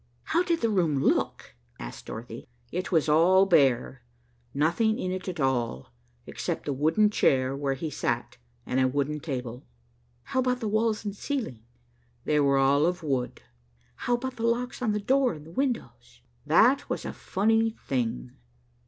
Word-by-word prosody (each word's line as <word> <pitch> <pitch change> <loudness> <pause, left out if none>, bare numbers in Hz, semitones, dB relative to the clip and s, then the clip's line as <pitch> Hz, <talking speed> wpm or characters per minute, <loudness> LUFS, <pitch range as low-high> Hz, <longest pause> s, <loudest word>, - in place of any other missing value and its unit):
"How 340 - +1
did 340 -2 0
the 230 - +2
room 170 -8 +1
look?" - - 0 0.2
asked - - -9
Dorothy. 115 +1 -8 0.2
"It 185 +3 -3
was 160 -3 +2
all 175 +5 +5
bare. 135 -7 +2 0.5
Nothing 170 - +1
in 185 - -2
it 185 0 -5
at 175 -3 -6
all, 120 - -1 0.3
except - - -4
the 145 - -1
wooden 160 +10 +2
chair 130 -8 +2
where 140 -1 -1
he 155 +3 -5
sat - - -2 0.3
and 130 - 0
a 130 - +4
wooden 145 +3 -1
table." 125 -5 -5 0.6
"How - - -2
about 250 -1 +1
the 225 - -3
walls 215 +1 0
and 205 -1 -3
ceiling?" 230 - -4 0.7
"They 150 0 +2
were 140 -1 +3
all 140 +3 +4
of 180 0 -2
wood." 130 -5 -2 0.5
"How 245 - 0
about 260 +2 -5
the 230 0 0
locks 245 +2 -1
on 230 -4 +1
the 210 - 0
door 260 +3 +2
and 155 +2 -12
windows?" 265 -3 -3 0.3
"That 275 +3 +4
was - - -3
a - - -4
funny 225 +3 +1
thing. 115 - -2
165 Hz, 165 wpm, -27 LUFS, 135-225 Hz, 0.7 s, all